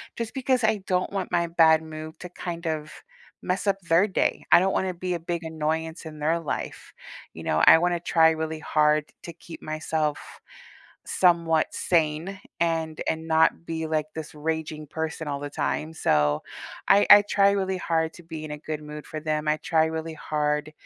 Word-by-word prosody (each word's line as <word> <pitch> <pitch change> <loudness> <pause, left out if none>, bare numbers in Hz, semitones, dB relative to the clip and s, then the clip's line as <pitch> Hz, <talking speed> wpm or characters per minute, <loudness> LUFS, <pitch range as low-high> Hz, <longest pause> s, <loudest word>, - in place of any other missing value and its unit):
just 230 -1 -5
because 260 -2 0
I 220 -3 +1
don't 180 -1 0
want 195 -2 -3
my 170 0 +1
bad 160 -1 +5
mood 155 0 -9
to 180 - -8
kind 170 -1 -6
of 155 -1 -3 0.5
mess 185 +3 -2
up 195 0 +2
their 170 +3 +3
day. 190 - -1
I 175 - +9
don't 190 +2 +1
wanna 190 -1 0
be 180 +1 -3
a 175 - -2
big 170 +1 -4
annoyance 160 +1 -3
in 155 -1 -9
their 160 +3 +1
life, 165 - -5 0.4
you - - -9
know? 80 - +1
I - - +9
wanna 175 +1 +1
try 165 -1 +4
really 160 0 -3
hard 150 -1 +2 0.2
to 170 - -8
keep 165 0 -12
myself 155 -1 -2 0.8
somewhat 170 -3 +2
sane 165 +3 0 0.2
and 165 -2 -1
and 160 0 -3
not 160 +1 +2
be, 160 -1 -3
like 155 -1 0
this 160 -1 -7
raging 155 0 -3
person 160 +1 -4
all 140 -1 -3
the 145 0 -5
time, 155 +2 -2
so, 75 - +1 0.4
I 205 - +5
I 205 0 +10
try 200 -1 +3
really 190 -1 -1
hard 160 -2 -1
to 175 - -14
be 160 -1 -7
in 155 - -7
a 150 - -5
good 155 0 -5
mood 150 0 -9
for 155 - -5
them. 155 0 -2
I 150 0 +2
try 160 +1 +2
really 160 0 -4
hard, 150 -1 -2
160 Hz, 190 wpm, -25 LUFS, 155-175 Hz, 0.8 s, I